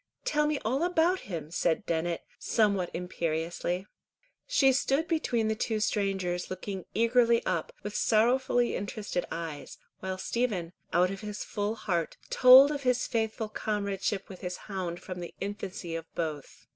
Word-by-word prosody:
Tell 300 0 +2
me 300 -1 +1
all 260 +6 +1
about 355 +1 +3
him," 160 -4 -5
said 170 -1 0
Dennet, 170 0 -1 0.2
somewhat 200 -5 +2
imperiously. 175 +1 -2 0.6
She 275 - +4
stood 275 +4 +1
between 245 -10 +1
the 220 - +2
two 220 0 -1
strangers 190 -4 -1
looking 185 0 -5
eagerly 230 +1 +4
up - - -1
with 205 +1 -5
sorrowfully 240 +2 +3
interested 200 -2 -3
eyes, 160 -4 -6 0.2
while 190 0 -4
Stephen, 190 -6 -1 0.2
out 180 +2 +3
of 195 - -6
his 210 -1 -5
full 205 +1 -2
heart, 180 -7 -2
told 260 +3 +9
of 290 -1 -3
his 250 -2 +2
faithful 220 -1 -1
comradeship 200 -2 -2
with 190 - -11
his 180 -1 -4
hound 185 -4 -4
from 180 -1 -7
the 175 - -7
infancy 195 -4 -5
of 165 0 -5
both. 155 -4 -4
205 Hz, 150 wpm, -29 LUFS, 180-235 Hz, 0.6 s, told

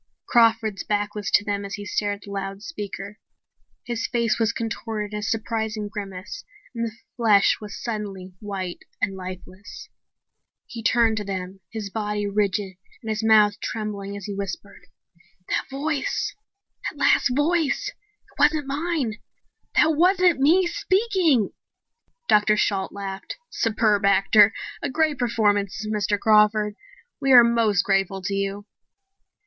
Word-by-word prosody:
Crawford's 225 -3 +3
back 205 0 -1
was 205 -2 -4
to 205 - +3
them 205 -1 -2
as 200 0 -5
he 205 - -8
stared 205 0 -1
at 200 - -17
the 200 - -10
loudspeaker. 200 - -6 0.7
His 235 -2 -2
face 235 -1 0
was 225 -1 +2
contorted 220 -2 -4
in 210 - -2
a - - -6
surprised 220 +1 -2
grimace 200 - -7 0.3
and 230 -1 -2
the 220 - -9 0.2
flesh 215 -4 +4
was 210 -1 -8
suddenly 200 -5 -5
white 195 -4 -5 0.2
and 195 - -1
lifeless. 185 - -9 0.8
He 230 - -8
turned 225 0 +3
to 210 - -2
face 195 -1 -3
them, 185 +1 -8
his 215 -3 -5
body 210 -1 -2
rigid 200 -2 -1 0.3
and 220 - -5
his 215 0 -2
mouth 215 -2 +5
trembling 200 -2 -4
as 200 - -8
he 205 - -4
whispered: 200 0 -7 0.6
"That - - -1
voice 295 - -2 0.6
that - - -14
last - - +3
voice 315 +1 +1
it 415 -5 -28
wasn't 295 0 +3
mine! 280 -5 -2 0.6
That 315 0 +4
wasn't 360 -1 +4
me 335 +7 +4
speaking!" 370 - +1 0.8
Dr. 210 0 +4
Shalt 195 -2 0
laughed. 195 -1 -6
"Superb 215 -2 +1
actor. 200 +2 +5 0.3
A - - -2
great 310 +1 +1
performance, 205 -4 +1
Mr. 210 -1 0
Crawford. 210 -1 +4 0.4
We 270 -1 +1
are 245 -1 +10
most 230 -4 +2
grateful 195 -1 0
to 195 - -2
you." 200 +1 -2
210 Hz, 145 wpm, -24 LUFS, 200-235 Hz, 0.8 s, are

